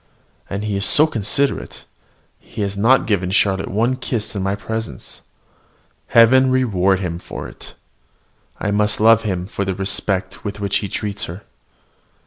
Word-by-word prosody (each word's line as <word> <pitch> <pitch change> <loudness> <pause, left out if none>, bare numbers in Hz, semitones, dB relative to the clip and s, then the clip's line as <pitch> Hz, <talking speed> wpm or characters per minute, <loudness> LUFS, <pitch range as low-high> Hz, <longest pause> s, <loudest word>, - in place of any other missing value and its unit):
And 100 +1 -4
he 105 -1 -2
is 100 - -1
so 155 - +7
considerate: 140 +1 -1 0.5
he 110 - -8
has 100 0 -3
not 115 +7 +3
given 95 -4 0
Charlotte 95 0 +1
one 115 +6 +1
kiss 115 -4 -3
in 100 - -2
my 95 +1 -1
presence. 110 +2 -6 0.9
Heaven 130 +3 +5
reward 100 -8 +2
him 85 -2 -4
for - - -8
it! - - -13 0.8
I 100 - -1
must 105 +1 +1
love 115 +1 +5
him 95 -5 -3
for 100 +1 -4
the 95 -1 -2
respect 95 0 -2
with 100 -1 -5
which 100 -1 0
he 100 - -4
treats 105 +1 -2
her. 90 +5 -9
100 Hz, 155 wpm, -19 LUFS, 95-115 Hz, 0.9 s, so